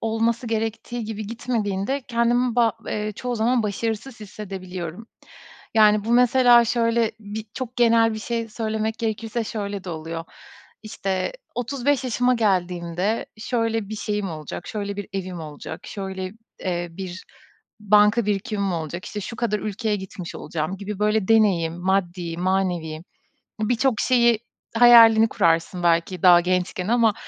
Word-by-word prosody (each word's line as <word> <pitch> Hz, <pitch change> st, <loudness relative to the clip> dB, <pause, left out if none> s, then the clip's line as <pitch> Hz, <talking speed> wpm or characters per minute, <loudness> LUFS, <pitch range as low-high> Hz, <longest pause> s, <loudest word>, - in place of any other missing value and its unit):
olması 225 Hz, +2 st, 0 dB
gerektiği 225 Hz, +1 st, -3 dB
gibi 215 Hz, -1 st, -5 dB
gitmediğinde 230 Hz, +1 st, -2 dB
kendimi 240 Hz, +1 st, +1 dB
ba 230 Hz, -2 st, +4 dB
eee, 210 Hz, 0 st, -2 dB
çoğu 250 Hz, -1 st, -3 dB
zaman 235 Hz, +2 st, +2 dB
başarısız 220 Hz, +4 st, -3 dB
hissedebiliyorum. 190 Hz, -2 st, -7 dB, 0.7 s
Yani, 210 Hz, -1 st, +5 dB
bu 230 Hz, -, 0 dB
mesela 245 Hz, 0 st, +6 dB
şöyle, 230 Hz, -1 st, +1 dB
bir 210 Hz, +1 st, -6 dB
çok 255 Hz, -1 st, -6 dB
genel 230 Hz, -2 st, +4 dB
bir -, -, -4 dB
şey 230 Hz, 0 st, -3 dB
söylemek 220 Hz, 0 st, -2 dB
gerekirse 225 Hz, +1 st, -2 dB
şöyle 205 Hz, -3 st, -4 dB
de 180 Hz, -, -5 dB
oluyor; 165 Hz, 0 st, -5 dB, 0.6 s
işte, 195 Hz, -4 st, -2 dB, 0.2 s
35 265 Hz, +2 st, 0 dB
yaşıma 250 Hz, 0 st, +2 dB
geldiğimde 185 Hz, -2 st, 0 dB
şöyle 225 Hz, -2 st, -1 dB
bir 215 Hz, -, -5 dB
şeyim 205 Hz, -2 st, -2 dB
olacak, 155 Hz, -2 st, -7 dB
şöyle 200 Hz, -2 st, -4 dB
bir 205 Hz, -1 st, -6 dB
evim 185 Hz, -3 st, -4 dB
olacak, 155 Hz, +1 st, -8 dB
şöyle, 190 Hz, -2 st, -5 dB, 0.3 s
eee, 175 Hz, -1 st, -2 dB
bir 185 Hz, +1 st, -7 dB, 0.6 s
banka 210 Hz, +2 st, +4 dB
birikimim 200 Hz, -1 st, -1 dB
olacak, 170 Hz, +2 st, -4 dB
işte, 210 Hz, -, -5 dB
şu 215 Hz, +3 st, -6 dB
kadar 220 Hz, -2 st, 0 dB
ülkeye 215 Hz, +1 st, -2 dB
gitmiş 190 Hz, -2 st, -8 dB
olacağım 160 Hz, +3 st, -4 dB
gibi 200 Hz, +1 st, -6 dB
böyle 210 Hz, -1 st, +1 dB
deneyim, 195 Hz, -8 st, +3 dB
maddi, 175 Hz, -2 st, -1 dB
manevi 175 Hz, -4 st, -1 dB, 0.6 s
birçok 235 Hz, +1 st, +1 dB
şeyi 235 Hz, -3 st, +4 dB, 0.4 s
hayalini 225 Hz, -2 st, +8 dB
kurarsın 170 Hz, -1 st, +1 dB
belki 170 Hz, +1 st, +1 dB
daha 175 Hz, -1 st, +8 dB
gençken 180 Hz, +1 st, -1 dB
ama 230 Hz, -1 st, +3 dB
210 Hz, 135 wpm, -23 LUFS, 185-230 Hz, 0.7 s, hayalini